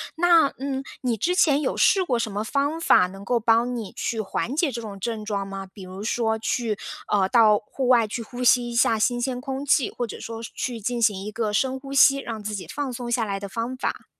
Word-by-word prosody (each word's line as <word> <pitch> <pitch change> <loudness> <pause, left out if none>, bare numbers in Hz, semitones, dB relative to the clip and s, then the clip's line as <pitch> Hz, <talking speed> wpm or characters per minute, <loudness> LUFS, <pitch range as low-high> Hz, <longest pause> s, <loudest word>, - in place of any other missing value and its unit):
那 335 -2 +5
嗯， 270 0 -3 0.2
你 245 -3 0
之 325 - 0
前 295 -5 +3
有 - - -1
试 385 - +4
过 250 -9 0
什 230 - -1
么 205 +2 -2
方 285 +7 -1
法， 180 - +5
能 195 +2 -11
够 240 +4 +1
帮 230 +2 +2
你 220 -4 -6
去 225 - -3
缓 220 +4 -2
解 315 +1 +1
这 235 -2 -5
种 205 -3 -8
症 220 +1 -3
状 200 -2 -3
吗？ 195 0 -6
比 195 - -11
如 185 +2 -8
说， 220 0 0
去 220 -1 -1 0.3
呃， 195 -2 +2
到 220 -2 +5
户 250 +4 -4
外 240 -3 +5
去 220 +3 -4
呼 245 +2 -6
吸 245 0 +4
一 235 - -6
下 225 -1 +3
新 240 +2 +1
鲜 250 0 -2
空 270 +1 -5
气， 275 -1 +3
或 240 - -3
者 225 - -8
说 230 0 -7
是 - - -7
去 240 -3 -4
进 240 +3 -2
行 210 -4 +2
一 210 - -5
个 215 -1 -2
深 260 +4 0
呼 275 +1 -8
吸， 275 0 +6
让 230 -5 -6
自 210 +1 -4
己 195 -3 -5
放 285 -3 -4
松 245 0 -5
下 240 -1 +1
来 200 -2 -3
的 200 - -6
方 230 +5 -4
法？ - - -3
235 Hz, 265 characters per minute, -24 LUFS, 215-260 Hz, 0.3 s, 吸